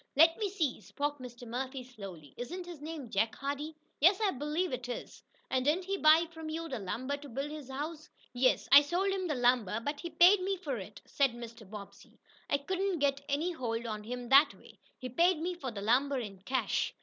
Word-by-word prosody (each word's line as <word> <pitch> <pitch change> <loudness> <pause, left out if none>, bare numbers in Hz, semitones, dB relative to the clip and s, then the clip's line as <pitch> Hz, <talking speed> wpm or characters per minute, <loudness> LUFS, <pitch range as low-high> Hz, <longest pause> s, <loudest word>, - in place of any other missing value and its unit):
"Let 330 +3 +7
me 415 -2 0
see," 315 - -1
spoke 290 +8 -3
Mr. 245 -1 -9
Murphy 260 +2 -4
slowly, 195 - -10
"isn't 350 +9 -5
his 345 -4 -9
name 300 -6 -7
Jake 220 +3 +1
Hardee?" 285 +3 -4 0.2
"Yes, 365 +7 +5
I 420 -3 +2
believe 300 +4 -2
it 250 -1 -4
is." 245 - -6 0.3
"And 260 -1 +2
didn't 320 +7 +1
he 390 +1 -1
buy 320 -2 +6
from 320 -1 -7
you 330 +1 -3
the 260 -6 -4
lumber 255 +9 -3
to 285 0 -11
build 275 +5 -4
his 300 -4 -8
house?" 300 +4 -5 0.2
"Yes, 255 +1 +2
I 280 +1 +11
sold 350 +7 0
him 380 -2 -1
the 300 - -1
lumber, 245 -4 +2
but 290 +5 -3
he 340 - -5
paid 355 +4 +6
me 385 +1 -1
for 290 -8 -3
it," 200 +2 -10
said 275 -4 +2
Mr. 230 -3 -10
Bobbsey. 205 -2 -11 0.3
"I 280 - +3
couldn't 375 +5 -1
get 280 -1 +1
any 305 +6 0
hold 235 -7 -3
on 215 -2 -4
him 245 +2 -5
that 280 +2 +7
way. - - -18 0.2
He 255 - -6
paid 345 +5 +1
for 265 - -2
the 210 -4 -6
lumber 265 +6 +2
in 205 -6 -5
cash." 260 +7 -1
280 Hz, 210 wpm, -32 LUFS, 245-330 Hz, 0.3 s, I